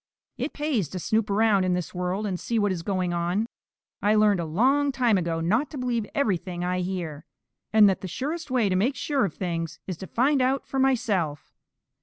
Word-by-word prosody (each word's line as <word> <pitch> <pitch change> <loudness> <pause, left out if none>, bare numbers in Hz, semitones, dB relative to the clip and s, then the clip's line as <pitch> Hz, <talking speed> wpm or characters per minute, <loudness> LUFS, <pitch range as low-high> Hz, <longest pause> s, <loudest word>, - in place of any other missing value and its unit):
"It 265 +5 -3
pays 280 - -1
to 185 - -5
snoop 215 +4 0
around 205 -1 +3
in 180 -1 +1
this 180 -3 -4
world 180 +3 -2
and 185 -3 -2
see 235 - -2
what 205 -2 +2
is 180 -3 -2
going 185 -1 -1
on. 175 +5 0 0.6
I 210 +1 +3
learned 210 -3 +4
a 170 - -2
long 265 - +2
time 245 -5 +2
ago 170 -3 -1
not 220 - +1
to 300 - -8
believe 240 -4 -1
everything 185 -8 -1
I 180 0 0
hear, 175 -5 -4 0.5
and 215 -1 +7
that 195 - +1
the 190 - -5
surest 300 - -4
way 250 -4 +2
to 185 - +1
make 235 +9 +1
sure 280 -6 0
of 175 - -5
things 165 -3 -3
is 185 -4 -5
to 190 - -8
find 270 +3 +2
out 260 +1 +1
for 270 - -3
myself. 210 - 0
200 Hz, 210 wpm, -26 LUFS, 180-250 Hz, 0.6 s, and